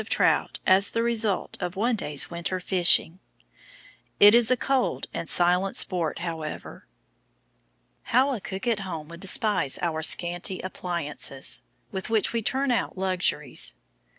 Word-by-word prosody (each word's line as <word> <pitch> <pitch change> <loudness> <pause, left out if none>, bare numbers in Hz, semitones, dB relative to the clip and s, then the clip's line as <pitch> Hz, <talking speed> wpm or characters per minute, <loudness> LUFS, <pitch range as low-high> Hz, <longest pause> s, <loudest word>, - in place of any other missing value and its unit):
of - - -12
trout - - +1
as 190 +2 +4
the 230 - -2
result 225 -4 -1
of 180 0 -5
one 230 +5 0
day's 150 -8 -1
winter 170 +2 -4
fishing. 180 -1 +3 1.0
It 205 +1 +8
is 235 -1 +5
a 255 - +2
cold 265 0 -1
and 165 - -6
silent 180 +2 +2
sport, 170 -4 +1
however. 160 -2 -8 1.2
How 265 +4 +2
a 225 - -6
cook 190 +1 -7
at 230 -4 0
home 165 -6 -7
would 170 0 -11
despise 185 -5 +3
our 160 -2 -3
scanty 175 +3 +2
appliances, 170 -7 -3 0.3
with 190 +3 -6
which 220 0 +1
we 230 - -1
turn 265 +4 -1
out 230 -5 -2
luxuries. 185 - 0
185 Hz, 145 wpm, -25 LUFS, 170-220 Hz, 1.2 s, It